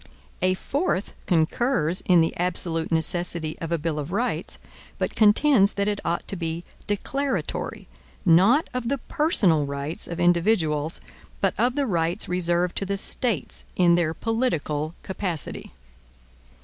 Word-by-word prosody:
A 185 0 +2
fourth 270 - -2
concurs 175 - +2
in 180 -2 +6
the 165 - 0
absolute 170 -2 0
necessity 165 -1 +1
of 165 -1 -5
a 170 - +2
bill 155 -1 -2
of 150 +3 -5
rights, 235 +6 -2 0.4
but - - -2
contends 215 0 +4
that 200 0 -1
it 205 -1 -1
ought 170 - -2
to - - -3
be 165 -1 -4 0.2
declaratory, 270 +7 -3 0.4
not 195 - +5
of 250 -2 -2
the 280 - 0
personal 195 - +2
rights 140 +3 -4
of 170 0 -6
individuals, 170 -3 +1 0.4
but - - +1
of 250 +1 +1
the 285 -1 +1
rights 175 -2 -1
reserved 175 0 0
to 195 - -1
the 200 0 -1
States 235 +3 0
in 175 -2 +4
their 165 -2 +1
political 165 - -1
capacity. 185 -5 -4
180 Hz, 140 wpm, -24 LUFS, 165-215 Hz, 0.4 s, in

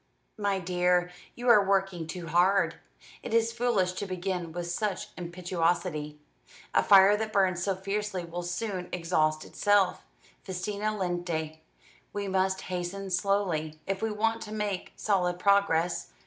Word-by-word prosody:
"My 200 -1 +1
dear, 180 0 +1 0.2
you 245 +1 -5
are 210 -4 +7
working 195 -4 0
too 170 +1 -6
hard. 175 +1 +3 0.4
It 225 - -3
is 230 0 +3
foolish 230 -6 +1
to 200 +2 -4
begin 180 -2 -3
with 175 +1 -4
such 190 +3 -2
impetuosity. 175 -3 -2 0.6
A - - +5
fire 195 0 +7
that 215 +1 -3
burns 185 -3 +2
so 195 +1 0
fiercely 195 -1 -3
will 170 +1 -5
soon 180 +1 -4
exhaust 155 -3 0
itself. 205 -3 +2 0.4
Festina 205 +3 -3
lente. 175 -4 -2 0.5
We 205 -1 -3
must 190 0 +1
hasten 185 +2 -4
slowly, 175 -5 0
if 195 0 -2
we 225 - 0
want 225 +2 0
to 210 - -7
make 210 -3 -3
solid 180 -4 +1
progress. 180 - +2
185 Hz, 140 wpm, -28 LUFS, 175-200 Hz, 0.6 s, are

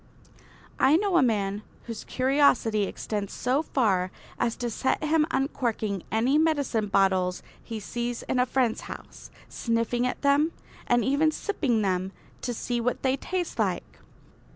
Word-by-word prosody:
I 270 +3 +5
know 395 -1 0
a - - +6
man 205 -4 +1 0.2
whose 230 -2 -7
curiosity 255 -5 +3
extends 205 0 -4
so 255 +4 +1
far 200 - +1 0.3
as 230 - +1
to 240 -1 -3
set 260 +6 0
him 305 0 +3
uncorking 230 - -1
any 245 +7 +3
medicine 285 -9 +1
bottles 190 -2 +2 0.2
he 225 -2 -5
sees 240 +3 -4
in 255 - -1
a 250 - +3
friend's 245 -3 +1
house, - - -10 0.2
sniffing 230 +1 0
at 250 - -4
them, 285 +3 +3 0.3
and 240 -2 +3
even 285 +4 +3
sipping 285 - 0
them 190 0 -1 0.3
to 245 - -2
see 240 +1 -2
what 245 +1 -1
they 260 0 +3
taste 355 +5 -3
like. - - -1
240 Hz, 150 wpm, -27 LUFS, 215-280 Hz, 0.3 s, a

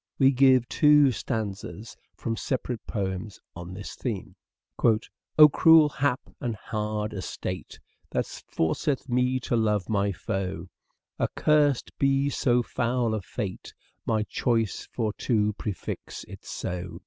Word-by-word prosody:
We 135 -1 +5
give 130 -2 +5
two 150 -2 +5
stanzas 110 -1 -4 0.2
from 115 -2 -3
separate 125 -1 -3
poems 95 -1 -3 0.2
on 85 +1 -8
this 100 +1 -7
theme: 110 -7 -5 0.2
" - - -19 0.5
O 155 -1 +11
cruel 160 +1 +6
hap 135 -2 0 0.2
and 120 -3 -2
hard 105 0 -3
estate 95 -1 -5 0.3
That - - 0
forceth 130 - -2
me 125 +1 +1
to 120 - -1
love 105 -4 +1
my 100 -1 +1
foe; 95 -1 -4 0.5
Accursed 150 -4 +2
be 135 +1 +2
so 120 -3 +2
foul 120 -1 0
a 110 - -1
fate, 95 +1 -6 0.3
My 110 -1 +2
choice 115 -1 -1
for 110 -3 -1
to 105 -4 +1
prefix 100 -1 -5
it - - -12
so. 90 -1 -5
115 Hz, 130 wpm, -27 LUFS, 100-130 Hz, 0.5 s, O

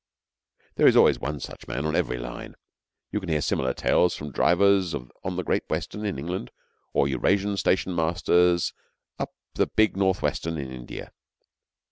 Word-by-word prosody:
There - - +6
is - - +6
always - - +6
one 75 0 -3
such - - -9
man 70 +4 -3
on 75 - 0
every 60 - 0
line. - - -7 0.6
You 105 - 0
can 95 -4 -7
hear 80 -2 +2
similar 65 -2 0
tales 90 - +2
from 75 -1 -7
drivers 95 +3 +3
on 65 +9 -6
the 90 - -2
Great - - -1
Western 105 0 -3
in 100 - -2
England 85 -1 -4 0.4
or 70 - +2
Eurasian 95 +10 +1
stationmasters 85 -1 +2 0.5
on - - -1 0.3
the - - +1
big 110 -4 +2
North 95 -1 +1
Western 80 0 -1
in 70 -3 -5
India. 60 -2 -8
85 Hz, 160 wpm, -26 LUFS, 70-95 Hz, 0.6 s, There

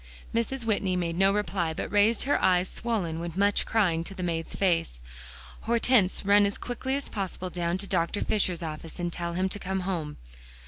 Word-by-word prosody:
Mrs. 235 +2 -1
Whitney 200 -4 +1
made 170 -2 -1
no 195 +2 +4
reply, 195 -5 -1
but - - -4
raised 205 +2 +3
her 285 - +1
eyes 180 0 +3
swollen 185 -10 -2
with 170 0 -5
much 200 +1 +2
crying, 180 -7 +2
to 195 - -7
the 185 - -5
maid's 165 -2 -3
face. 165 - +1 0.7
"Hortense, 230 -5 +3
run 205 0 +5
as 200 - -3
quickly 260 +2 -3
as 280 - -2
possible 185 -2 -4
down 175 0 -1
to 195 - -3
Dr. 170 +4 0
Fisher's 185 -5 0
office, 160 0 -6
and 175 -1 -2
tell 170 -1 -3
him 185 +2 +1
to 205 - -2
come 190 0 -2
home." 170 -5 -3
190 Hz, 190 wpm, -27 LUFS, 170-205 Hz, 0.7 s, run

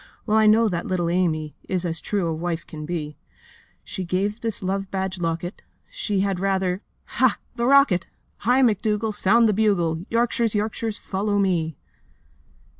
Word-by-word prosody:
Well 215 - +1
I 220 0 +5
know 220 +2 +5
that 175 -4 -2
little 175 -2 0
Amy 160 -4 0
Is 185 -1 0
as 165 -1 -2
true 180 -5 -1
as 160 - -6
wife 170 -1 -2
can 150 -1 -8
be. 150 -4 -4 0.7
She - - -6
to - - -8
give 200 +5 -1
this 225 -4 -3
love 195 +1 -2
badged 190 -1 -3
locket! 165 +3 -3 0.3
She 210 - -1
had 195 -2 0
rather... 190 -1 0 0.2
Ha, 255 -3 +2 0.2
the 235 -1 0
rocket! 275 -11 +5 0.3
Hi, 250 +5 +3
McDougall! 215 -1 +1
Sound 225 +3 +4
the 215 - +2
bugle! 175 -6 +1
Yorkshires, 230 -1 +1
Yorkshires, 215 +1 -2
follow 205 +1 -1
me! 170 -6 0
195 Hz, 165 wpm, -23 LUFS, 175-215 Hz, 0.7 s, I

